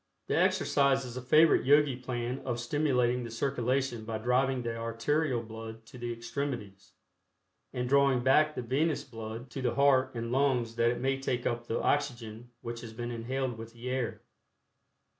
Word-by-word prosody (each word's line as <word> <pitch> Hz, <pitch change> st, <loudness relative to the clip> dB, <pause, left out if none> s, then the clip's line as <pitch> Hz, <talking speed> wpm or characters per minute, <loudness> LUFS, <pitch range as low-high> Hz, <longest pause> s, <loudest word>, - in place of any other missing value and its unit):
The -, -, -1 dB
exercise 135 Hz, -1 st, +3 dB
is 125 Hz, -1 st, -8 dB
a 130 Hz, -, -4 dB
favorite 155 Hz, +6 st, +5 dB
Yogi 145 Hz, 0 st, +4 dB
plan 125 Hz, 0 st, -3 dB
of 120 Hz, -3 st, -3 dB
stimulating 125 Hz, -2 st, +1 dB
the 120 Hz, -, -6 dB
circulation 125 Hz, 0 st, -1 dB
by 110 Hz, 0 st, -3 dB
driving 125 Hz, +3 st, +1 dB
the 115 Hz, -1 st, -3 dB
arterial 115 Hz, +3 st, 0 dB
blood 110 Hz, 0 st, -9 dB
to 125 Hz, +2 st, -12 dB
the 120 Hz, 0 st, -3 dB
extremities, 115 Hz, -5 st, -5 dB, 0.8 s
and 125 Hz, 0 st, -2 dB
drawing 135 Hz, -2 st, +3 dB
back 150 Hz, +4 st, +4 dB
the 125 Hz, -, -3 dB
venous 145 Hz, +6 st, 0 dB
blood 115 Hz, 0 st, -8 dB
to 135 Hz, -, -5 dB
the 120 Hz, -2 st, 0 dB
heart 140 Hz, -2 st, +3 dB
and 115 Hz, 0 st, -3 dB
lungs 125 Hz, -4 st, +1 dB
that 115 Hz, 0 st, +4 dB
it 120 Hz, -, -1 dB
may 135 Hz, +1 st, 0 dB
take 125 Hz, -2 st, -2 dB
up 120 Hz, 0 st, -2 dB
the 115 Hz, -, -1 dB
oxygen 120 Hz, -5 st, -1 dB
which 115 Hz, 0 st, -6 dB
has 115 Hz, -2 st, -9 dB
been 120 Hz, +1 st, -5 dB
inhaled 120 Hz, +1 st, -3 dB
with 115 Hz, 0 st, -9 dB
the 120 Hz, +2 st, -6 dB
air. 130 Hz, -3 st, -2 dB
125 Hz, 175 wpm, -30 LUFS, 115-135 Hz, 0.8 s, favorite